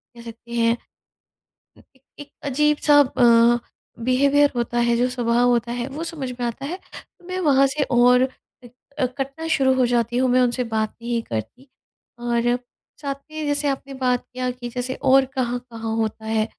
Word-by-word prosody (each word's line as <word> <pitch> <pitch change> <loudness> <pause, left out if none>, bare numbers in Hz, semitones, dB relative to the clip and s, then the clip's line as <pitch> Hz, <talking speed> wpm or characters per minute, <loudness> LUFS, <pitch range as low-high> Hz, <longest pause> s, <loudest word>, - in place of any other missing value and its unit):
कह 235 - -11
सकते 235 0 -12
हैं 230 0 +2 1.2
एक 265 - -28 0.2
एक 290 -1 -10
अजीब-सा 295 +1 +3
अ, 240 -3 +5 0.5
बिहेवियर 280 +3 +3
होता 240 0 -1
है 235 - +3
जो 245 +1 +2
स्वभाव 245 -1 +1
होता 235 -1 +1
है 240 +1 -3
वो 295 +4 -5
समझ 300 -6 -5
में 245 - -1
आता 235 +4 -5
है। 340 +6 -4 0.2
तो 355 - -14
मैं 370 0 -3
वहाँ 275 -2 +5
से 285 +2 -1
और 250 +1 +5 0.4
इ - - -11 0.3
अ, 260 - +3
कटना 275 +5 -5
शुरू 270 -5 +3
हो 255 -1 +3
जाती 240 0 0
हूँ, 255 0 +2
मैं 255 +1 +4
उनसे 250 0 +1
बात 220 -1 0
नहीं 235 0 -1
करती। 115 - -6 0.5
और 240 0 +1 0.4
साथ 280 -2 -3 0.2
में 310 0 -4
जैसे 290 0 0
आपने 275 0 -3
बात 255 -2 0
किया 255 0 -2
कि 245 -1 -7
जैसे 250 +1 -3
और 270 0 +5
कहाँ-कहाँ 240 -3 -3
होता 220 -1 -2
है? 220 0 +1
250 Hz, 175 wpm, -22 LUFS, 235-275 Hz, 1.2 s, अ